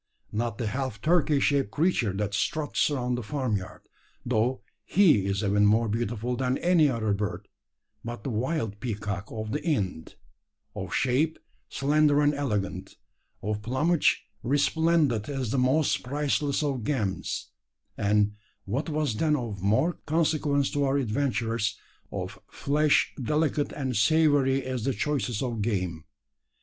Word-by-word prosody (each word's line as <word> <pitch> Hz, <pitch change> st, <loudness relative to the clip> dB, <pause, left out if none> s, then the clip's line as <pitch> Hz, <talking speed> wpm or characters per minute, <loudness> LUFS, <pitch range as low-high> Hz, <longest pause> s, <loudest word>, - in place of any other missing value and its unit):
Not 115 Hz, 0 st, -2 dB
the 115 Hz, -, -2 dB
half 130 Hz, -1 st, -3 dB
turkey 155 Hz, -, +3 dB
shaped 140 Hz, -6 st, +2 dB
creature 145 Hz, -, +1 dB
that 100 Hz, +1 st, -2 dB
struts 155 Hz, +8 st, 0 dB
around 125 Hz, -4 st, -1 dB
the 120 Hz, -, -2 dB
farmyard 115 Hz, -6 st, -3 dB, 0.4 s
though 125 Hz, +2 st, 0 dB, 0.2 s
he 155 Hz, -, +4 dB
is 100 Hz, +2 st, -1 dB
even 105 Hz, 0 st, +3 dB
more 110 Hz, +2 st, +3 dB
beautiful 115 Hz, +2 st, -2 dB
than 130 Hz, +1 st, 0 dB
any 170 Hz, -4 st, +4 dB
other 110 Hz, -5 st, 0 dB
bird 100 Hz, 0 st, -3 dB, 0.6 s
but 115 Hz, -3 st, -6 dB
the 135 Hz, -, -3 dB
wild 115 Hz, -2 st, -2 dB
peacock 105 Hz, -3 st, -3 dB
of 110 Hz, -1 st, -5 dB
the 145 Hz, -, -2 dB
Ind 95 Hz, -, -2 dB, 0.6 s
of 95 Hz, -3 st, -5 dB
shape 140 Hz, +8 st, +1 dB, 0.3 s
slender 145 Hz, +1 st, +3 dB
and 145 Hz, 0 st, +3 dB
elegant 110 Hz, -9 st, -3 dB, 0.5 s
of 105 Hz, +1 st, -2 dB
plumage 145 Hz, +9 st, +1 dB, 0.2 s
resplendent 145 Hz, -2 st, +2 dB
as 135 Hz, -5 st, -2 dB
the 135 Hz, -, +1 dB
most 135 Hz, +4 st, +2 dB
priceless 145 Hz, +2 st, 0 dB
of 135 Hz, -5 st, -1 dB
gems 105 Hz, -8 st, -2 dB, 0.4 s
and, 105 Hz, 0 st, +2 dB, 0.3 s
what 135 Hz, -, -2 dB
was 150 Hz, -7 st, -1 dB
then 150 Hz, +4 st, +2 dB
of 115 Hz, -8 st, -4 dB
more 130 Hz, -, +1 dB
consequence 150 Hz, -3 st, +1 dB
to 145 Hz, -2 st, 0 dB
our 135 Hz, 0 st, +2 dB
adventurers, 115 Hz, -4 st, -1 dB, 0.3 s
of -, -, -5 dB
flesh 150 Hz, +1 st, +2 dB
delicate 150 Hz, +2 st, 0 dB
and 130 Hz, -4 st, -3 dB
savoury 135 Hz, +2 st, +3 dB
as 130 Hz, -3 st, -3 dB
the 135 Hz, -, 0 dB
choicest 120 Hz, -2 st, -1 dB
of 120 Hz, -4 st, -2 dB
game. 90 Hz, -7 st, -2 dB
130 Hz, 140 wpm, -27 LUFS, 105-145 Hz, 0.6 s, he